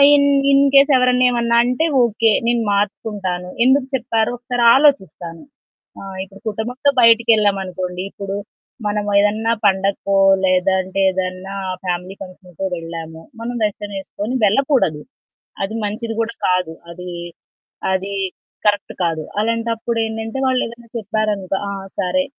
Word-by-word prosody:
In 280 Hz, 0 st, +4 dB, 0.2 s
in case 275 Hz, +1 st, +5 dB
ఎవరన్నా 250 Hz, 0 st, +3 dB
ఏమన్నా 235 Hz, -1 st, +1 dB
అంటే 250 Hz, +6 st, 0 dB, 0.2 s
ఓకే. 225 Hz, -1 st, +3 dB, 0.2 s
నేను 240 Hz, 0 st, +2 dB
మార్చుకుంటాను. 200 Hz, -3 st, -2 dB
ఎందుకు 265 Hz, +1 st, +3 dB
చెప్పారో 230 Hz, -3 st, 0 dB
ఒకసారాలోచిస్తాను. 240 Hz, -, +2 dB, 0.6 s
ఆహ్, 195 Hz, -1 st, -8 dB
ఇప్పుడు 195 Hz, +1 st, -15 dB
కుటుంబంతో 245 Hz, +7 st, -1 dB
బయటకెళ్ళామనుకోండి 200 Hz, -6 st, +2 dB
ఇప్పుడు 195 Hz, 0 st, -5 dB, 0.5 s
మనం 210 Hz, 0 st, -1 dB
ఏదన్నా 215 Hz, +3 st, +2 dB
పండగకో 195 Hz, 0 st, +1 dB, 0.3 s
లేదంటే 190 Hz, +1 st, +1 dB
ఏదన్నా 185 Hz, +1 st, -4 dB, 0.3 s
ఫ్యామిలీ 180 Hz, +1 st, -3 dB
ఫంక్షన్‌కో 185 Hz, -1 st, -8 dB
వెళ్ళాము, 165 Hz, -1 st, -8 dB, 0.2 s
మనం 240 Hz, +1 st, -4 dB
వెస్టర్న్ 205 Hz, -1 st, -3 dB
వేసుకొని 205 Hz, +5 st, -5 dB
వెళ్ళకూడదు. 215 Hz, -, +2 dB, 0.6 s
అది 205 Hz, +3 st, -4 dB
మంచిది 225 Hz, +2 st, -3 dB
కూడా 230 Hz, 0 st, -2 dB
కాదు. 180 Hz, -3 st, +1 dB, 0.2 s
అది, 180 Hz, +1 st, -8 dB, 0.8 s
అది 190 Hz, +1 st, -2 dB, 0.5 s
కరెక్ట్ 205 Hz, -1 st, +1 dB
కాదు. 165 Hz, -2 st, -1 dB, 0.2 s
అలాంటప్పుడు 230 Hz, +1 st, -1 dB
ఏంటంటే 225 Hz, +2 st, -5 dB
వాళ్ళేదైనా 235 Hz, -2 st, -2 dB
చెప్పారనుకో, 210 Hz, -3 st, -1 dB
ఆ! -, -, -3 dB, 0.3 s
సరే, 275 Hz, +10 st, +1 dB
210 Hz, 115 wpm, -19 LUFS, 190-235 Hz, 0.8 s, in case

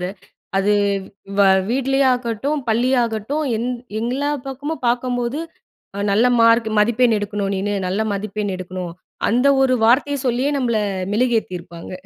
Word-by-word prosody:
அத 180 Hz, -, -3 dB, 0.5 s
அது 200 Hz, +2 st, +2 dB, 0.7 s
வ 200 Hz, -, +6 dB, 0.3 s
வீட்லேயே 270 Hz, +2 st, +1 dB
ஆகட்டும் 245 Hz, +5 st, -2 dB
பள்ளியாகட்டும் 240 Hz, +3 st, +1 dB
எந் 240 Hz, +3 st, -2 dB, 0.3 s
எல்லா 260 Hz, +5 st, -1 dB, 0.2 s
பக்கமும் 285 Hz, +3 st, -5 dB
பார்க்கும்போது 245 Hz, +2 st, 0 dB, 0.7 s
நல்ல 225 Hz, +5 st, +4 dB
மார்க் 230 Hz, 0 st, +5 dB
மதிப்பெண் 235 Hz, +2 st, +3 dB
எடுக்கணும் 205 Hz, -1 st, -2 dB
நீனு 205 Hz, +2 st, -1 dB
நல்ல 190 Hz, +4 st, -1 dB
மதிப்பெண் 205 Hz, 0 st, -3 dB
எடுக்கணும் 180 Hz, -1 st, -6 dB, 0.4 s
அந்த 250 Hz, +5 st, +2 dB, 0.2 s
ஒரு 255 Hz, -1 st, +3 dB
வார்த்தையை 280 Hz, +4 st, +3 dB
சொல்லியே 250 Hz, +4 st, +1 dB
நம்மள 235 Hz, -4 st, +1 dB, 0.4 s
மெழுகேத்தியிருப்பாங்க. 185 Hz, -8 st, -2 dB
235 Hz, 120 wpm, -20 LUFS, 205-255 Hz, 0.7 s, வ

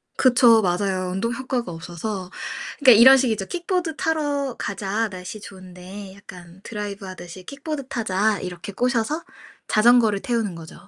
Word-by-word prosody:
그쵸. 240 Hz, -3 st, +5 dB
맞아요 185 Hz, 0 st, 0 dB
운동 230 Hz, +6 st, -1 dB
효과가 250 Hz, -5 st, -3 dB
없어서. 180 Hz, +3 st, -6 dB, 0.5 s
그러니까 255 Hz, -6 st, +7 dB
이런 265 Hz, +3 st, +9 dB
식이죠. 225 Hz, -7 st, 0 dB
"킥보드 350 Hz, -2 st, -2 dB
타러 290 Hz, -5 st, -1 dB
가자, 205 Hz, +2 st, -2 dB
날씨 185 Hz, +2 st, -8 dB
좋은데. 190 Hz, 0 st, -10 dB
약간 180 Hz, -2 st, -13 dB
드라이브 205 Hz, -2 st, -6 dB
하듯이 185 Hz, 0 st, -9 dB
킥보드 280 Hz, -, -6 dB
타자." 215 Hz, -4 st, 0 dB
이렇게 180 Hz, +1 st, -7 dB
꼬셔서 250 Hz, -, 0 dB, 0.4 s
자전거를 220 Hz, -2 st, +4 dB
태우는 225 Hz, -7 st, -1 dB
거죠. 165 Hz, -1 st, -11 dB
210 Hz, 350 characters per minute, -23 LUFS, 185-250 Hz, 0.5 s, 이런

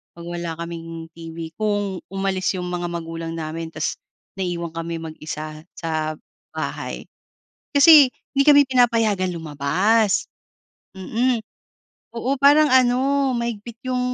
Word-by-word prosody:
pag 170 Hz, 0 st, -10 dB
wala 175 Hz, -1 st, -4 dB
kaming 165 Hz, -1 st, -6 dB
TV. 165 Hz, -1 st, -8 dB
Kung 205 Hz, -3 st, -1 dB
umalis 195 Hz, -1 st, 0 dB
yung 180 Hz, -, -4 dB
mga 175 Hz, 0 st, -3 dB
magulang 165 Hz, -1 st, -5 dB
namin 160 Hz, +1 st, -5 dB
tapos 155 Hz, -1 st, -2 dB, 0.4 s
naiiwan 170 Hz, -2 st, -2 dB
kami 165 Hz, 0 st, -4 dB
mag-isa 155 Hz, -1 st, -7 dB
sa 155 Hz, -1 st, -2 dB, 0.4 s
bahay. -, -, -5 dB, 0.7 s
Kasi 285 Hz, -2 st, +8 dB, 0.2 s
hindi 275 Hz, -, +4 dB
kami 285 Hz, -1 st, +7 dB
pinapayagan 225 Hz, -7 st, +2 dB
lumabas, 180 Hz, +8 st, +1 dB, 0.7 s
mm. 235 Hz, +5 st, 0 dB, 0.8 s
Oo 260 Hz, +4 st, 0 dB
parang 295 Hz, +2 st, +6 dB
ano, 260 Hz, +2 st, +3 dB
mahigpit 235 Hz, -1 st, -4 dB
yung 255 Hz, 0 st, 0 dB
185 Hz, 115 wpm, -22 LUFS, 165-240 Hz, 0.8 s, Kasi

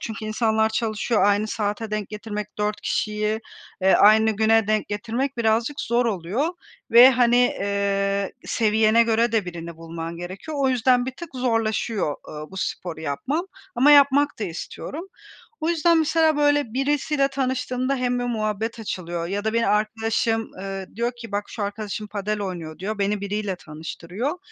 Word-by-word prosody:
çünkü 220 Hz, -1 st, -6 dB
insanlar 220 Hz, 0 st, +1 dB
çalışıyor, 220 Hz, 0 st, 0 dB
aynı 205 Hz, +1 st, +3 dB
saate 210 Hz, +1 st, -3 dB
denk 215 Hz, -2 st, -3 dB
getirmek, 210 Hz, -1 st, -6 dB
4 210 Hz, 0 st, -1 dB
kişiyi, 215 Hz, +1 st, -1 dB, 0.4 s
eee, 190 Hz, -, +5 dB
aynı 220 Hz, +1 st, +6 dB
güne 220 Hz, 0 st, +3 dB
denk 215 Hz, 0 st, 0 dB
getirmek 235 Hz, +6 st, -2 dB
birazcık 230 Hz, +5 st, +1 dB
zor 240 Hz, +1 st, +1 dB
oluyor 210 Hz, -, -1 dB, 0.4 s
ve, 245 Hz, +3 st, +9 dB
hani, 245 Hz, -1 st, +3 dB
eee, 200 Hz, -3 st, +1 dB
seviyene 220 Hz, +1 st, +3 dB
göre 230 Hz, 0 st, +2 dB
de 220 Hz, -4 st, +2 dB
birini 170 Hz, -1 st, -7 dB
bulman 165 Hz, 0 st, -6 dB
gerekiyor. 185 Hz, -, -7 dB
O 270 Hz, -, +3 dB
yüzden 250 Hz, 0 st, +3 dB
bir 260 Hz, -, -3 dB
tık 340 Hz, -, -8 dB
zorlaşıyor, 225 Hz, -, 0 dB
ııı, 155 Hz, 0 st, -7 dB
bu 190 Hz, -, -11 dB
sporu 175 Hz, -3 st, -4 dB
yapmam 260 Hz, -, -2 dB, 0.3 s
ama 270 Hz, +4 st, +5 dB
yapmak 285 Hz, 0 st, +5 dB
da 215 Hz, -, -2 dB
istiyorum. 280 Hz, -, -6 dB, 0.5 s
O 315 Hz, -, -1 dB
yüzden 335 Hz, 0 st, +3 dB
mesela, 315 Hz, -1 st, +3 dB
böyle, 290 Hz, -5 st, +2 dB
birisiyle 280 Hz, +1 st, +1 dB
tanıştığımda 260 Hz, 0 st, -1 dB
hem 245 Hz, -1 st, 0 dB
bir 245 Hz, -, -2 dB
muhabbet 220 Hz, -1 st, -2 dB
açılıyor 175 Hz, -5 st, -4 dB
ya 205 Hz, +3 st, -3 dB
da 220 Hz, -, 0 dB
beni 230 Hz, 0 st, +1 dB
arkadaşım, 225 Hz, +2 st, 0 dB
ııı, 195 Hz, 0 st, -6 dB
diyor 235 Hz, +1 st, 0 dB
ki 230 Hz, -3 st, -10 dB
bak, 205 Hz, 0 st, -1 dB
şu 215 Hz, -, -5 dB
arkadaşım 210 Hz, +1 st, -4 dB
padel 210 Hz, +1 st, -3 dB
oynuyor 170 Hz, -5 st, -5 dB
diyor, 205 Hz, +3 st, -4 dB
beni 200 Hz, 0 st, 0 dB
biriyle 200 Hz, -1 st, -2 dB
tanıştırıyor. 175 Hz, -, -5 dB
220 Hz, 160 wpm, -23 LUFS, 200-245 Hz, 0.5 s, ve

